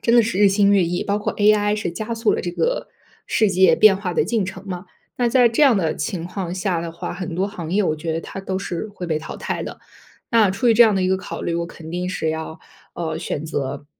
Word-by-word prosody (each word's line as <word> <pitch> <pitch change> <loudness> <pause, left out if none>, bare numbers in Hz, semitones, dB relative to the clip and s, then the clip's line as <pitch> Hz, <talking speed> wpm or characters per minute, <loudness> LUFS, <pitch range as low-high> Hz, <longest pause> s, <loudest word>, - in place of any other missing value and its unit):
真 235 - +2
的 235 - +7
是 215 -3 -2
日 205 -1 +6
新 200 +1 +3
月 195 - +4
异， 175 +1 -1
包 205 +1 0
括 210 - -2
AI 210 0 +3
是 210 -5 -2
加 215 +6 -4
速 225 -1 +1
了 - - -1
这 175 - -3
个 - - -1 0.4
世 215 -2 +2
界 185 +1 +5
变 215 -3 +6
化 190 -3 -4
的 - - +2
进 225 -4 0
程 190 +1 -8
嘛。 180 0 -6 0.3
那 240 -1 +2
在 245 -1 +5
这 230 +7 +1
样 265 -6 +6
的 165 -5 0
情 165 +2 -3
况 180 -1 -4
下 180 -3 -1
的 165 -1 -5
话， 170 - -5
很 180 -2 -5
多 190 +3 0
行 175 -6 -7
业 210 - +3
我 155 -5 0
觉 160 +1 -3
得 165 - -2
它 195 - -7
都 190 -1 -3
是 185 +1 -4
会 180 -4 -6
被 155 -2 0
淘 155 - -8
汰 - - -3
的。 - - -7 0.5
那 225 -4 +4
出 195 +6 0
于 225 - +5
这 240 - +8
样 220 -3 +4
的 190 - +1
一 185 - +1
个 190 - +2
考 190 - -7
虑， 170 - -1
我 170 - -1
肯 165 -1 -11
定 180 +1 -3
是 170 -4 -2
要， 160 0 -5 0.4
呃， 165 -2 -3
选 150 - -4
择 145 -2 -4
190 Hz, 290 characters per minute, -21 LUFS, 170-210 Hz, 0.5 s, 这